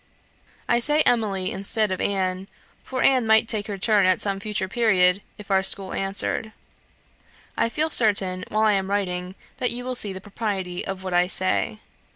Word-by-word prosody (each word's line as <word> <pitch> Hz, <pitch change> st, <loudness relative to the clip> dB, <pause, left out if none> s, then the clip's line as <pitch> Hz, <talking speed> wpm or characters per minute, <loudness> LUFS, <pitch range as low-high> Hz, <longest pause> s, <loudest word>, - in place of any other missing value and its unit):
I 235 Hz, -, +2 dB
say 295 Hz, +5 st, +4 dB
Emily 205 Hz, -8 st, +1 dB
instead 205 Hz, +2 st, 0 dB
of 185 Hz, -, -3 dB
Anne; 190 Hz, -1 st, -2 dB, 0.4 s
for 260 Hz, -1 st, -3 dB
Anne 255 Hz, -4 st, +3 dB
might 220 Hz, +1 st, +4 dB
take 215 Hz, -2 st, 0 dB
her 205 Hz, -2 st, -5 dB
turn 205 Hz, -1 st, +2 dB
at 185 Hz, -1 st, +3 dB
some 195 Hz, -1 st, 0 dB
future 210 Hz, -2 st, -3 dB
period, 190 Hz, -4 st, +2 dB, 0.2 s
if 210 Hz, -1 st, -10 dB
our 190 Hz, 0 st, +3 dB
school 195 Hz, 0 st, 0 dB
answered. 200 Hz, +3 st, -2 dB, 1.0 s
I 230 Hz, -, 0 dB
feel 310 Hz, +6 st, -2 dB
certain, 195 Hz, -6 st, +3 dB
while 215 Hz, +1 st, 0 dB
I 215 Hz, -, +4 dB
am 195 Hz, -1 st, -1 dB
writing, 185 Hz, -2 st, -2 dB, 0.2 s
that 250 Hz, -, 0 dB
you 245 Hz, +1 st, -3 dB
will 255 Hz, -, -3 dB
see 210 Hz, -5 st, 0 dB
the 190 Hz, -, -6 dB
propriety 195 Hz, -3 st, -4 dB
of 190 Hz, -1 st, -6 dB
what 185 Hz, -1 st, -4 dB
I 175 Hz, 0 st, +3 dB
say. 105 Hz, -, 0 dB
200 Hz, 185 wpm, -23 LUFS, 185-220 Hz, 1.0 s, say